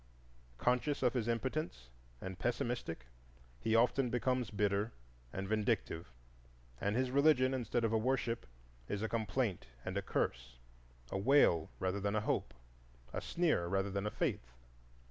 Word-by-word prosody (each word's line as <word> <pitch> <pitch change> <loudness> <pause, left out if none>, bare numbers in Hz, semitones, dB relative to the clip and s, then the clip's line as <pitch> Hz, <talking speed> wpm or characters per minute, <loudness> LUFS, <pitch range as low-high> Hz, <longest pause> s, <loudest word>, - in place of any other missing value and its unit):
Conscious 125 - +1
of 125 -2 +4
his 120 -3 0
impotence, 115 - -2 0.3
and 95 -1 -6
pessimistic, 120 - -2 0.5
he 110 - +1
often 125 +2 +4
becomes 125 -1 0
bitter 105 +1 0 0.4
and 95 0 -4
vindictive; 100 -5 0 0.7
and 100 +2 0
his 130 0 +1
religion, 135 -2 +5
instead 120 -2 0
of 115 -1 +1
a 110 - +4
worship, 120 -1 0 0.4
is 105 +1 -2
a - - +1
complaint 110 - -1 0.2
and - - -3
a - - +1
curse, - - -2 0.5
a 95 - -1
wail 100 - +5
rather 95 +2 -1
than 100 +1 0
a 110 - +2
hope, 65 - 0 0.6
a - - -2
sneer 160 - +1
rather 95 +2 0
than 100 +1 -1
a - - +1
faith. 60 - -1
110 Hz, 145 wpm, -35 LUFS, 95-125 Hz, 0.7 s, religion